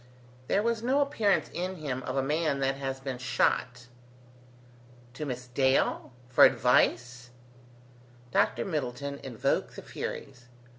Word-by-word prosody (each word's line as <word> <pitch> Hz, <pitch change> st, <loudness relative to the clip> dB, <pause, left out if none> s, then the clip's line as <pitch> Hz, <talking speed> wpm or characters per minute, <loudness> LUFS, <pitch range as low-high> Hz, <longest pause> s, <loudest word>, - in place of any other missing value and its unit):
There 200 Hz, -, +2 dB
was 230 Hz, -1 st, 0 dB
no 260 Hz, +4 st, +2 dB
appearance 225 Hz, -9 st, +1 dB
in 185 Hz, +2 st, -3 dB
him 140 Hz, -6 st, -4 dB
of 130 Hz, +1 st, -4 dB
a 135 Hz, -, +2 dB
man 150 Hz, +1 st, 0 dB
that 135 Hz, 0 st, +1 dB
has 135 Hz, -1 st, -4 dB
been 135 Hz, -2 st, -5 dB
shot. 125 Hz, -1 st, 0 dB, 1.3 s
"To 150 Hz, +4 st, -5 dB
Miss 125 Hz, -1 st, -5 dB
Dale? 130 Hz, +1 st, +1 dB, 0.2 s
for 125 Hz, -, +5 dB
advice?" 125 Hz, -1 st, +3 dB, 1.0 s
Dr -, -, +1 dB
Middleton 140 Hz, -4 st, -3 dB
invoked 120 Hz, -4 st, -2 dB
the -, -, -9 dB
Furies. 125 Hz, 0 st, -7 dB
135 Hz, 130 wpm, -29 LUFS, 125-160 Hz, 1.3 s, for